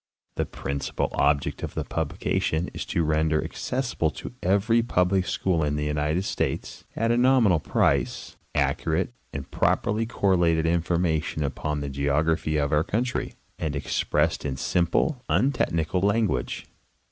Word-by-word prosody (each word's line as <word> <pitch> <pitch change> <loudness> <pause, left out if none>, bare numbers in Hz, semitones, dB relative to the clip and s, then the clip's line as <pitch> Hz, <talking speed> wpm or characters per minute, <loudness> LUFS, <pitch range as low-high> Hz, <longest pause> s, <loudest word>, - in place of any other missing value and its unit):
The - - -2
principal 70 0 -3
object 70 0 +1
of - - -5
the - - -1
publication 80 +3 -1
is - - -5
to 85 - 0
render 80 0 +1
accessible 125 -11 -1
to 75 - -8
every 100 +5 +3
public 95 -4 +1
school 85 -4 0
in 75 0 0
the 75 0 -1
United 75 +5 0
States, - - -3
at 115 +1 +1
a 120 - +3
nominal 120 -8 +4
price, - - 0 0.2
accurate 85 +8 0 0.2
and 70 -1 -7
properly 110 +2 +1
correlated 90 -7 +2
information 85 -2 0
upon 75 +2 -2
the 70 - -3
geog 70 +3 +1
raphy 80 -1 +1
of 70 +1 0
our 75 +1 +4
country, 120 +7 -2 0.2
and 80 -3 -2
expressed 70 - 0
in 65 -3 -3
simple, 90 - +1
untechnical 90 - +1
language. 100 - 0
80 Hz, 140 wpm, -26 LUFS, 75-100 Hz, 0.2 s, nominal